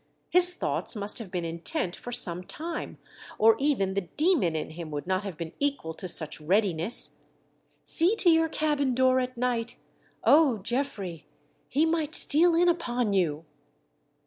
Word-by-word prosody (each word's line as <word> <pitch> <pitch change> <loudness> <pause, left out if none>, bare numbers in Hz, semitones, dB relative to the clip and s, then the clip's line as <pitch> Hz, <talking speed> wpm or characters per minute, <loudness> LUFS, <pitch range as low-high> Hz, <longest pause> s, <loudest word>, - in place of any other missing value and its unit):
His 360 0 +7
thoughts - - -3
must 205 +1 -1
have 220 -5 -8
been 175 -2 -4
intent 175 - -3
for 245 - -9
some 180 -7 -1
time 325 - -6 0.4
or 225 +1 +5
even 260 -10 0
the 200 - -1
demon 225 - 0
in 155 - -4
him. 165 0 -8
would 145 -1 -5
not 185 +2 -1
have 195 -6 -7
been 165 -1 -6
equal 280 - -2
to 185 - -7
such 155 -3 -4
readiness. 185 +3 +2 0.7
See 350 +6 +3
to 360 -5 +3
your 325 0 +3
cabin 295 -5 0
door 260 0 +3
at 255 -1 -4
night 240 -1 -2 0.3
— - - -36
O! 290 -6 +4
Geoffrey, 205 - -4 0.4
he 300 +4 +2
might 320 -1 -1
steal 335 +3 +4
in 350 +1 +3
upon 245 -10 0
you. 165 -5 0
240 Hz, 165 wpm, -27 LUFS, 180-300 Hz, 0.7 s, His